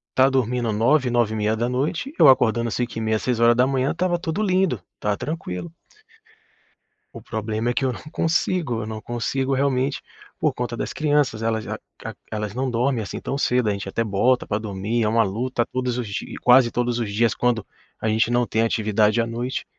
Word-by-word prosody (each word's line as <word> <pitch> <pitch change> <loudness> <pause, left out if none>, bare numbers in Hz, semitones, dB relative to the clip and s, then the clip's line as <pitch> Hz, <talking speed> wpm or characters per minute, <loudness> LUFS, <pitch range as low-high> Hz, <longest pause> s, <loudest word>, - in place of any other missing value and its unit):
tá 130 +1 +5
dormindo 125 -3 0
21:00, 125 +5 +2
21:30, 120 - 0
eu - - +8
acordando 120 -3 +4
05:30, 115 -2 -1
06:00 125 +3 +2
tava 180 -1 +1
tudo 170 +3 -2
lindo, 185 - +1 0.2
tava 105 -1 0
tranquilo. 155 - -5 1.4
O - - -9
problema 110 +2 -2
é - - -2
que 135 - -1
eu 130 - +1
não - - -8
consigo, 165 -8 0
eu - - -5
não 110 0 -6
consigo 130 +4 -2
realmente 135 0 0 0.4
por - - +1
conta 120 -1 -4
das - - -4
crianças, 145 -7 +1
elas 110 -1 -1
a - - -3 0.3
a - - -4 0.2
elas 105 -2 -3
não 130 +2 -1
dormem 120 +1 +1
assim 100 - -6
tão - - -4
cedo, 125 -4 +1
a - - +2
gente 100 -1 -5
até 115 - -1
bota 115 +5 +2
pra 105 - 0
dormir, 105 +2 -2
é - - +2
uma 115 +1 +3
luta 120 +4 -1
todos 125 -1 -2
os 120 -3 -3
dias 100 - -5
quase 125 -1 +6
todos 120 -1 0
os 110 -3 -2
dias 115 +2 +2
quando 120 -4 0 0.3
a - - -2
gente 110 +1 +2
não 120 0 +2
tem 110 -1 0
atividade 110 -1 +2
à 115 - +2
noite. 120 +3 -3
120 Hz, 185 wpm, -23 LUFS, 110-130 Hz, 1.4 s, eu